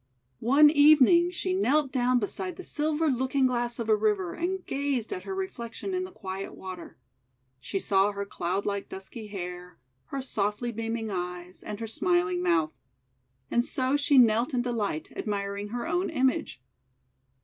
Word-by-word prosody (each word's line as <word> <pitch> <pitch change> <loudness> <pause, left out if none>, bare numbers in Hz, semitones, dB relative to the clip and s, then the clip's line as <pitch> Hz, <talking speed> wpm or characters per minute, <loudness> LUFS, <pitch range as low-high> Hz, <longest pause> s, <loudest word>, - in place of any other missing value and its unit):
One 290 +5 +6
evening 310 +3 +6
she 365 +1 -2
knelt 300 -6 +2
down 250 0 +2
beside 335 - -3
the 370 - -9
silver 310 0 0
looking 265 0 +1
glass 240 -1 0
of 230 - -4
a 215 - +5
river, 205 -5 0
and 370 +1 -3
gazed 275 - -2
at 370 - -6
her 385 - -4
re 380 0 -1
flection 235 +6 -6
in 370 0 -1
the 370 - -10
quiet 195 - -6
water. 185 -2 -9 0.6
She 165 - -4
saw 195 +1 +2
her 200 0 -4
cloud 190 0 -2
like 200 -1 -2
dusky 210 +3 -8
hair, 180 -3 -7 0.3
her 275 -1 -5
softly 210 0 -2
beaming 225 -1 -3
eyes, 180 0 -5
and 210 -1 -6
her 230 - -3
smiling 180 -4 +1
mouth. 165 -3 +2 0.8
And 240 - +3
so 260 +1 0
she 285 -1 +3
knelt 240 +3 +4
in 245 - +1
de 245 - -2
light, 205 -9 -2
admiring 200 -1 -3
her 235 +3 -4
own 350 +3 0
image. 260 - 0
235 Hz, 170 wpm, -28 LUFS, 200-285 Hz, 0.8 s, One